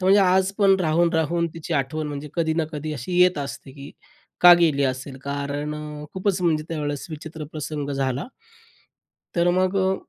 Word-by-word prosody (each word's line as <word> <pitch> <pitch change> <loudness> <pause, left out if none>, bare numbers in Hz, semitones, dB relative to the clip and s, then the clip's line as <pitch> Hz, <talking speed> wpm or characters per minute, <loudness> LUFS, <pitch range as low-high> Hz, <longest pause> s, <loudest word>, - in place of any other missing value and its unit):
तो 185 - +1
या 200 0 +6
आज 190 0 +2
पण 195 -2 +5
राहून, 170 +1 +2
राहून 170 +1 +1
तिची 165 0 -6
आठवण 150 +3 -1
म्हणजे 145 0 -6
कधी 160 -2 0
ना 165 0 +1
कधी 155 +1 -4
अशी 165 +7 -3
येत 180 -3 +5
असते, 140 -1 -6
की 140 +1 -10 0.5
का 175 0 +10
गेली 150 -5 +3
असेल? 130 +1 -3
कारण 145 +1 -3
अ, 150 0 -7
खूपच 190 0 0
म्हणजे 155 -3 +1
त्यावेळेस 145 -3 -3
विचित्र 155 0 -7
प्रसंग 150 -2 -4
झाला. 135 -1 -1 1.1
तर 170 +1 +3
मग 185 +2 +1
अ, 190 0 +2
155 Hz, 180 wpm, -23 LUFS, 145-175 Hz, 1.1 s, का